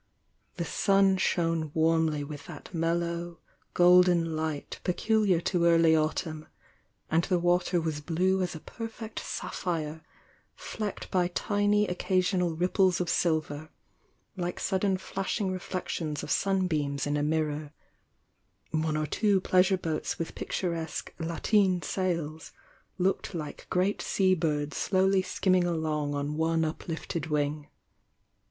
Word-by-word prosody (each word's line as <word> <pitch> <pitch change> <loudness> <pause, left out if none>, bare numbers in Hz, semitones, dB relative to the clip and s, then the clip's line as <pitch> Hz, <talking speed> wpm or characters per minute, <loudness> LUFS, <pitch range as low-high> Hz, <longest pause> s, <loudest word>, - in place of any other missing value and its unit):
The 170 - -3
sun 195 +2 +3
shone 165 -4 0
warmly 160 -2 +2
with 145 0 -8
that 160 +1 -10
mellow 170 +1 -1 0.4
golden 175 -2 +5
light 155 -2 -3
peculiar 205 0 +2
to 170 0 +1
early 165 -1 +5
autumn, 155 0 -1 0.6
and 165 +2 +3
the 185 - +2
water 175 +1 +2
was 160 -2 -2
blue 185 +4 +1
as 180 -2 -2
a - - -6
perfect 225 +3 -7
snpphire, 160 -3 -4 0.5
flecked 210 -3 -5
by 180 -2 +2
tiny 205 +3 +1
occasional 180 -2 0
ripples 180 +1 +2
of 175 -2 0
silver, 155 -2 0 0.7
like 175 -1 -3
sudden 190 0 +1
flash 195 +2 -3
ing 195 -3 0
reflections 175 -4 -3
of - - -5
sunbeams 155 -8 0
in 145 0 0
a 145 - 0
mirror; 150 -1 -1 1.0
one 155 -1 0
or 155 - 0
two 200 +5 +2
pleasure 185 +1 +3
boats 165 -3 -3
with 165 - -4
picturesque 170 -3 -3
"lateen"' 180 +3 +1
sails 165 -4 -2 0.5
looked 190 0 0
like 155 -3 -6
great 185 +3 +1
sea 190 -1 +2
birds 150 -4 -1
slowly 190 0 +3
skimming 185 -1 +1
along 155 -4 -1
on 145 +1 -2
one 160 0 +2
uplifted 160 0 -4
wing. 150 -1 -1
170 Hz, 125 wpm, -29 LUFS, 155-185 Hz, 1.0 s, golden